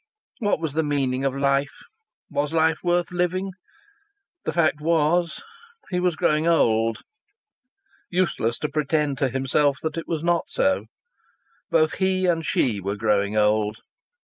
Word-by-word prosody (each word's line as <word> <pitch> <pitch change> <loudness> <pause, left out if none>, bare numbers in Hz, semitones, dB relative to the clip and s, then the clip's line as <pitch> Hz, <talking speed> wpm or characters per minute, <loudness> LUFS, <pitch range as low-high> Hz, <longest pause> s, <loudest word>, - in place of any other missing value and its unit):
What 205 -7 +1
was 160 -4 -3
the 160 - +1
meaning 135 -3 -1
of 135 -1 0
life? 140 0 0 0.5
Was 145 +2 -1
life 160 -1 +2
worth 175 0 +1
living? 180 +2 -1 0.9
The - - 0
fact 155 -2 +1
was 165 +2 +1 0.5
he 180 - 0
was 180 -2 +1
growing 155 +1 +1
old. 115 -8 +2 1.1
Useless 170 -11 0
to 150 - -1
pretend 150 -2 0
to 135 - +2
himself 135 +2 +1
that 160 0 -3
it 165 - -8
was 160 -2 -2
not 170 0 +1
so. 285 0 0 0.8
Both 470 -2 +2
he 190 -1 +1
and 165 -2 +1
she 115 -8 +1
were 100 +2 -2
growing 105 -1 +1
old. 105 0 +2
150 Hz, 145 wpm, -24 LUFS, 130-175 Hz, 1.1 s, life